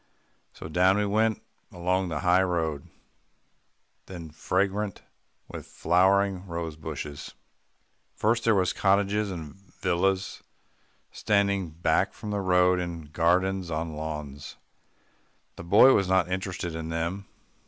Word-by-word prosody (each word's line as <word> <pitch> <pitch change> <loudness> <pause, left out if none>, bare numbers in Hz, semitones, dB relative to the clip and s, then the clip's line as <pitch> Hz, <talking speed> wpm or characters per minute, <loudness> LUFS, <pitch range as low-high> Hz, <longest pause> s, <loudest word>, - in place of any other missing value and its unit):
So - - -9
down 90 +5 +3
we 105 - +1
went 110 +2 +1 0.3
along 90 +1 -1
the 80 -2 -3
high 90 0 +4
road, 80 -6 -2 1.2
then 85 -4 -9
fragrant 100 +5 -1 0.4
with - - -9
flowering 95 +2 +2
rosebushes. 80 -3 -6 0.8
First, 115 +2 +1
there 115 -2 +3
were 95 -2 +2
cottages 100 +2 +1
and 80 -6 -7
villas 95 0 -2 0.7
standing 100 -3 +1
back 80 +3 0
from 105 -2 -6
the 100 -1 -1
road 90 -1 +3
in 85 -4 -6
gardens 90 +3 +1
and 80 - -2
on 80 -1 -5
lawns. 75 -2 -6 1.0
The - - -9
boy 105 +9 +7
was 100 - +2
not 95 -1 +2
interested 90 -2 -3
in 80 0 -5
them. 85 +4 -3
90 Hz, 120 wpm, -27 LUFS, 80-100 Hz, 1.2 s, boy